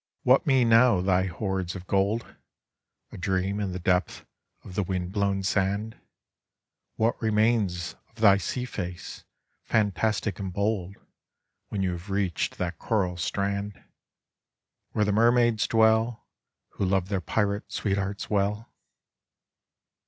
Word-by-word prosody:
Tttiat 130 +4 +4
mean 130 -4 +4
now 115 -3 +6
thy 95 0 +2
horde 95 -1 -3
of 90 -1 -8
gold 100 +5 0 0.8
A - - -9
dreaa 95 +2 -1
in 100 -2 -2
the 90 - -4
depth 90 +1 0 0.4
of - - -10
the 100 - 0
wind 90 -1 -3
blown 100 -1 0
Band? 100 +3 -1 1.0
TTnat 115 +1 +1
regains 105 -5 +1 0.2
of - - -32
thy 105 -4 +5
sea 125 +5 -3
face 90 -7 -6 0.4
fantastic 105 -1 0
and 95 -2 -4
bold 100 -1 -1
T?hen 100 0 -10
you 95 - 0
have 90 +3 -7
reached 95 -3 -1
that 85 -2 -3
coral 95 -5 0
strand, 100 +3 -2 1.2
TOiere 105 - +2
the 105 - +1
nsraaids 120 +1 +3
dwell, 110 +1 +2 0.5
?ho - - -1
love 95 -1 +1
their 100 -3 -1
pirate 100 +2 -1
sweethearts 100 -1 -2
well? 105 +2 -1
100 Hz, 130 wpm, -27 LUFS, 95-110 Hz, 1.2 s, now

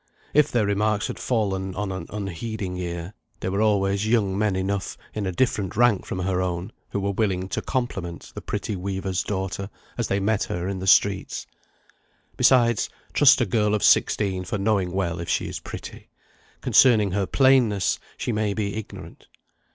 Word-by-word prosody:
If 150 0 +4
their 115 -3 +2
remarks 105 +1 +1
had - - -5
fallen 95 -5 -1
on 105 0 -2
an 95 - -5
unheeding 100 -1 -4
ear, 85 +1 -5 0.3
there 95 - -3
were 100 +2 0
always 100 -1 +2
young 105 -4 +2
men 105 -1 +1
enough, 95 0 -2 0.2
in 105 -3 -2
a - - -1
different 100 -2 0
rank 120 -5 +3
from - - -4
her 90 0 0
own, 90 0 -3 0.2
who - - -2
were 100 0 -1
willing 95 -3 0
to - - -2
compliment 95 -10 -4
the - - -7
pretty 105 - -3
weaver's 95 0 -2
daughter 95 -1 -3 0.3
as - - 0
they 100 - 0
met 105 +1 +1
her 90 +1 -3
in 95 -1 -3
the 95 - -5
streets. 95 +1 +3 0.9
Besides, 120 -4 +4 0.2
trust 140 -2 +6
a - - +3
girl 105 0 +1
of 105 - -2
sixteen 95 -3 +3
for 90 +3 -3
knowing 100 -3 +1
well 90 -3 -1
if 85 - -5
she - - 0
is - - -5
pretty; - - -9 0.5
concerning 110 -7 +5
her 100 0 0
plainness 120 -8 +3 0.2
she - - -2
may 105 -2 0
be 105 -1 -2
ignorant. 110 - -9
100 Hz, 175 wpm, -24 LUFS, 95-110 Hz, 0.9 s, trust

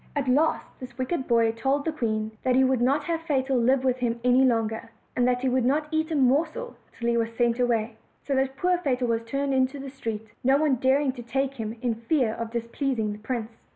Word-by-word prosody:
At 280 -2 -1
last 290 +5 +1
this 250 -2 -10
wicked 260 +2 -2
boy 230 -2 +3
told 270 +5 -1
the 320 - 0
queen 220 -6 -2
that 255 -1 +1
he 265 - +5
would 260 -2 +2
not 275 +4 +2
have 330 +1 -2
Fatal 270 -4 0
live 255 +2 +3
with 255 -1 +1
him 235 -1 -1
any 250 +1 +5
longer, 225 -2 0 0.3
and 245 0 +2
that 250 0 +1
he 265 - 0
would 255 0 +2
not 295 +5 +1
eat 315 0 0
a 320 - -1
morsel 305 - +1 0.2
till 235 - -5
he 235 0 +2
was 230 0 -1
sent 240 0 +2
away; 230 -2 0 0.3
so 280 - -2
that 265 0 0
poor 360 +2 +1
Fatal 255 -6 0
was 230 -1 0
turned 275 +4 -2
into 260 +2 +1
the 275 -1 -7
street, 225 -5 -5 0.2
no 265 +2 +4
one 290 -3 +2
daring 265 +2 +2
to 250 -1 -9
take 270 +3 -1
him 225 -3 -5
in 240 -2 +1
for 225 - -12
fear 255 -9 +2
of 230 0 -5
displeas 235 +3 -2
ing 215 -1 -1
the 210 - -10
prince. 225 0 -5
255 Hz, 240 wpm, -26 LUFS, 230-275 Hz, 0.3 s, he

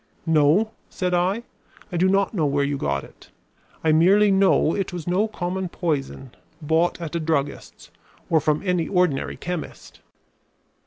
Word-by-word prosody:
"No," 160 +7 +3 0.2
said 180 -1 -2
I, 185 +6 +1 0.5
"I 175 - -2
do 185 +2 +3
not 195 +2 +1
know 160 -7 +1
where 140 0 +1
you 140 0 -1
got 70 - -2
it. - - -17 0.5
I 160 - +3
merely 195 +6 +5
know 190 -4 +3
it 195 -2 -2
was 175 -3 -6
no 185 +5 +1
common 185 -3 -4
poison 140 -7 -3 0.3
bought 160 +3 +1
at 170 -1 -6
a - - 0
druggist's, 155 -3 -3 0.4
or 160 - +3
from 150 0 0
any 180 -3 0
ordinary 180 -7 0
chemist." 180 -2 -7
170 Hz, 155 wpm, -23 LUFS, 155-185 Hz, 0.5 s, merely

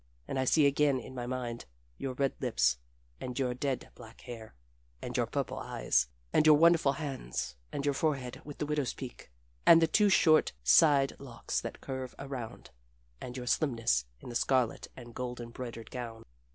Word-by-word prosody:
And 135 - -2
I 130 - +1
see 150 +3 +4
again 140 -1 +3
in 125 - -10
my 120 -1 -5
mind 120 -2 -4 0.3
your 135 -1 -3
red 135 0 +1
lips, - - +2 0.4
and 125 -1 -5
your 130 -3 0
dead 130 +1 -3
black 115 -1 -14
hair, 115 - -9 0.4
and - - -6
your - - +1
purple - - -3
eyes, - - +1 0.3
and - - +5
your 150 -1 +8
wonderful 165 -3 +5
hands, 135 - -4 0.2
and 140 - -3
your 145 - +2
forehead 135 -4 -1
with 145 -1 -9
the - - -2
widow's 150 -3 -1
peak, 130 - -9 0.3
and 165 - +8
the 165 - +5
two 205 +6 +4
short 160 -5 +5
side 145 -4 +5
locks 130 -4 -4
that - - -7
curve 130 -1 -5
around, 130 -5 -7 0.5
and 125 +1 -6
your 125 - -5
slimness 115 - +1
in - - -10
the 120 - -7
scarlet 125 -1 +1
and 120 -2 -10
gold 125 0 -4
embroidered 115 -1 -7
gown. 115 -3 -6
130 Hz, 180 wpm, -31 LUFS, 120-140 Hz, 0.5 s, your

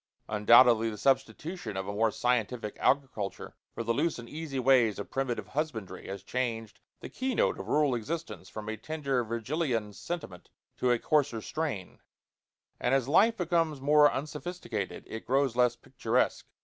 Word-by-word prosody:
Undoubtedly 115 +2 +6
the 105 - -6
substitution 135 - -1
of 95 0 -3
a 100 - -3
more 110 +2 +2
scientific 115 -1 -1
agriculture 130 -8 -1 0.2
for 115 - -5
the 115 +1 +1
loose 155 +6 0
and 120 -1 -9
easy 155 -1 -5
ways 125 -4 +4
of 100 - -7
primitive 135 -3 -2
husbandry 115 - -4
has 100 0 -6
changed 115 -2 -3 0.2
the - - -6
key 260 -1 -3
note - - +1
of - - -6
rural 150 -3 +2
existence 115 - -4
from 110 -1 -7
a 110 - -2
tender 140 +1 -2
Virgilian 115 -1 -2
sentiment 100 - -6 0.3
to 125 - 0
a 120 - +4
coarser 145 -2 +1
strain, 130 - -4 0.8
and 125 +2 +2
as 130 -2 +1
life 220 +10 +4
becomes 165 -4 +1
more 145 +2 +5
unsophisticated 150 - -4
it 110 - -8
grows 135 -1 +2
less 125 -1 +3
picturesque. - - -1
125 Hz, 160 wpm, -29 LUFS, 110-150 Hz, 0.8 s, Undoubtedly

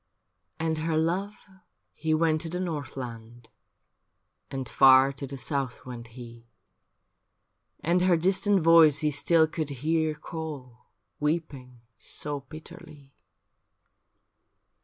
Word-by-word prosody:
And 160 -1 -1
her 160 0 -1
love 185 +6 -1 0.6
he 160 +1 -3
went 155 -1 +1
to 165 - -6
the 180 +2 -4
north 155 -8 -4
land, 115 -2 -9 1.0
And 135 -2 -5
far 130 +3 +6
to 140 +1 -7
the 135 +1 -7
south 130 0 -3
went 120 -2 -8
he, 120 -1 -11 1.3
And 175 +2 +1
her 180 -2 +4
distant 190 +3 +2
voice 160 -2 +6
he 150 -1 +1
still 160 +3 +4
could 155 -1 -4
hear 155 +3 -1
Call 145 -7 -8 0.3
weeping 145 -6 -3 0.2
so 145 +6 -5
bitterly. 140 -1 -13
150 Hz, 115 wpm, -27 LUFS, 130-165 Hz, 1.3 s, far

